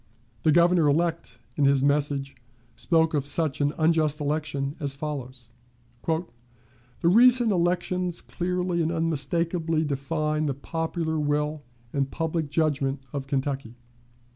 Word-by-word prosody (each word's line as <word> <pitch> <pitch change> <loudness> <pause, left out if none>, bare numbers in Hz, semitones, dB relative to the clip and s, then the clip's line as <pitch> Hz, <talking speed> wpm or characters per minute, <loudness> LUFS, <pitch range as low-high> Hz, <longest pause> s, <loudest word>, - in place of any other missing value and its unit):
The 155 - +3
Governor 170 0 +4
elect 165 +3 0 0.2
in 145 - +2
his 135 -1 +4
message 140 -1 0 0.4
spoke, 165 -1 +2
of 145 -3 +1
such 145 -1 +1
an 145 0 +2
unjust 155 -2 +2
election, 145 -1 -2
as 140 -2 -1
follows: 130 -5 -6 0.6
"The 165 +1 +1 0.8
recent 235 +6 +5
elections 180 0 0
clearly 180 0 -2
and 165 0 0
unmistakably 165 0 0
define 150 +1 -1
the 140 - -1
popular 160 +2 -3
will 150 +1 -1 0.3
and 140 -1 0
public 160 0 -2
judgment 140 -3 0
of 140 -1 -4
Kentucky. 135 -3 -2
155 Hz, 120 wpm, -26 LUFS, 140-165 Hz, 0.8 s, recent